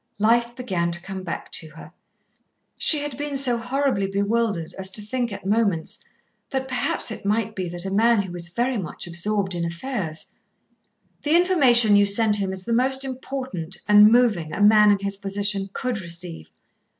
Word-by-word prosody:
Life 235 Hz, +3 st, +2 dB
began 185 Hz, -9 st, -2 dB
to 175 Hz, -, -1 dB
come 190 Hz, 0 st, -6 dB
back 175 Hz, -2 st, -6 dB
to 160 Hz, -, 0 dB
her. -, -, -13 dB, 0.8 s
She 310 Hz, -, +4 dB
had 290 Hz, -3 st, -5 dB
been 290 Hz, -1 st, -3 dB
so 250 Hz, -3 st, +3 dB
horribly 250 Hz, -4 st, -1 dB
bewildered 200 Hz, -3 st, -1 dB
as 190 Hz, -1 st, -1 dB
to 210 Hz, -, -1 dB
think 240 Hz, +2 st, -3 dB
at 200 Hz, -, -8 dB
moments 205 Hz, -1 st, 0 dB, 0.5 s
that 265 Hz, 0 st, -3 dB
perhaps 250 Hz, -2 st, 0 dB
it 220 Hz, -, -7 dB
might 215 Hz, +1 st, -1 dB
be 185 Hz, -2 st, -4 dB
that 175 Hz, +1 st, -6 dB
a 190 Hz, -, -4 dB
man 225 Hz, +1 st, +3 dB
who 190 Hz, -, -8 dB
was 175 Hz, -1 st, -6 dB
very 240 Hz, +5 st, -1 dB
much 175 Hz, -, -3 dB
absorbed 190 Hz, +3 st, -1 dB
in 170 Hz, -1 st, -3 dB
affairs 170 Hz, -1 st, -4 dB, 1.0 s
"The 300 Hz, +2 st, +1 dB
information 265 Hz, -, +5 dB
you 205 Hz, 0 st, +5 dB
sent 210 Hz, +1 st, +4 dB
him 195 Hz, -2 st, -2 dB
is 190 Hz, -1 st, -6 dB
the 235 Hz, -, -2 dB
most 265 Hz, +3 st, +2 dB
important, 255 Hz, -9 st, -5 dB
and 210 Hz, +1 st, +7 dB
moving, 220 Hz, -10 st, +2 dB
a -, -, -5 dB
man 210 Hz, 0 st, +6 dB
in 205 Hz, -, +4 dB
his 200 Hz, 0 st, -3 dB
position 200 Hz, 0 st, -1 dB
could 245 Hz, -1 st, -3 dB
receive." 170 Hz, -, -6 dB
210 Hz, 180 wpm, -23 LUFS, 190-245 Hz, 1.0 s, and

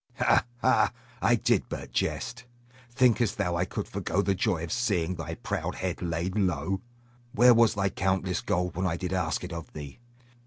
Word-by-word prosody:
Ha, -, -, +3 dB
ha! 130 Hz, -, +4 dB, 0.3 s
I 120 Hz, -, +4 dB
did 115 Hz, -, +1 dB
but -, -, -6 dB
jest. 120 Hz, +1 st, -2 dB, 0.4 s
Thinkest 120 Hz, -3 st, +2 dB
thou 90 Hz, -4 st, 0 dB
I 85 Hz, +1 st, +1 dB
could -, -, -4 dB
forego 100 Hz, -, -1 dB
the 100 Hz, -, +2 dB
joy 95 Hz, -4 st, 0 dB
of 85 Hz, -, -5 dB
seeing 95 Hz, -8 st, 0 dB
thy 85 Hz, -2 st, -5 dB
proud -, -, -3 dB
head 95 Hz, -2 st, -3 dB
laid 85 Hz, +2 st, -2 dB
low? 95 Hz, -2 st, 0 dB, 0.5 s
Where 120 Hz, +3 st, +7 dB
was 115 Hz, -1 st, +4 dB
thy 100 Hz, -1 st, +1 dB
countless 95 Hz, -1 st, 0 dB
gold 90 Hz, -1 st, -1 dB
when 90 Hz, +2 st, 0 dB
I 85 Hz, -1 st, -1 dB
did 90 Hz, 0 st, -3 dB
ask 85 Hz, -4 st, -1 dB
it 90 Hz, -1 st, -6 dB
of 85 Hz, -1 st, -7 dB
thee? 75 Hz, +2 st, -8 dB
95 Hz, 185 wpm, -28 LUFS, 85-110 Hz, 0.5 s, Where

